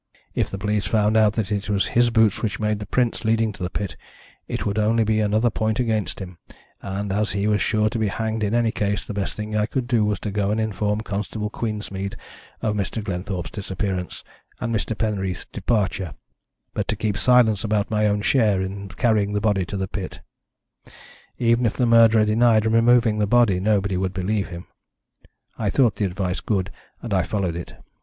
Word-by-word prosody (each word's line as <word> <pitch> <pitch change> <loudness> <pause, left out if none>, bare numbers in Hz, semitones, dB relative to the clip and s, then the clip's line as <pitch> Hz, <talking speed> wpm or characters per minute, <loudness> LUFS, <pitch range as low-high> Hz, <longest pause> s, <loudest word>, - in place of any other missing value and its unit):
If - - 0
the 100 - -5
police 105 +1 -1
found 110 -1 +2
out 110 -1 +5
that 110 -2 -2
it 100 -1 -2
was 100 -1 +1
his 120 0 +3
boots 110 -3 +3
which 100 -4 -2
made 105 -1 0
the 105 - -7
prints 125 0 0
leading 110 -1 +1
to 100 - -13
the 90 - -1
pit 100 0 -4 0.5
it - - -3
would 105 +1 0
only 110 +2 +3
be 110 0 +1
another 110 +2 +2
point 110 +1 -1
against 110 -4 -1
him, 90 -3 -8 0.4
and 100 +1 -4
as 105 +1 0
he 100 +1 -1
was 105 -1 +2
sure 110 0 +2
to 120 - -2
be 110 - +1
hanged 110 +2 -2
in 105 +2 0
any 120 -1 +2
case 100 -1 -1
the 110 - -5
best 100 -1 -3
thing 105 0 -4
I 105 0 +1
could 130 0 -2
do 120 -4 +2
was 105 -2 0
to 105 - -3
go 100 0 0
and 105 +2 0
inform 105 -1 -1
Constable 105 0 -4
Queensmead 105 -4 -4 0.5
of 110 - +1
Mr. 105 +2 -2
Glenthorpe's 90 -2 -4
disappearance 95 -3 -4 0.4
and 115 -2 -2
Mr. 110 0 -2
Penreath's 95 -5 -2
departure, 95 -7 -1 0.6
but - - -2
to 110 - 0
keep 105 0 -1
silence 115 -3 +4
about 105 -1 0
my 105 0 +2
own 105 0 0
share 110 -7 +3
in 100 +1 -4
carrying 105 +1 +1
the 105 - +1
body 100 -3 +1
to 100 - -5
the 95 0 -2
pit. 95 0 -6 1.2
Even 115 0 +2
if 115 - +2
the 125 - +1
murderer 115 -2 +6
denied 110 0 +3
removing 115 -1 +4
the 105 - +2
body 115 -5 +4
nobody 100 -1 +1
would 95 0 -2
believe 100 +2 -1
him. 85 -2 -8 0.9
I - - 0
thought 115 -7 +2
the 105 - +1
advice 95 0 -2
good, 95 -2 -1 0.3
and 115 -4 -3
I 95 - +3
followed 90 -2 -2
it. 85 - -7
105 Hz, 200 wpm, -23 LUFS, 100-110 Hz, 1.2 s, murderer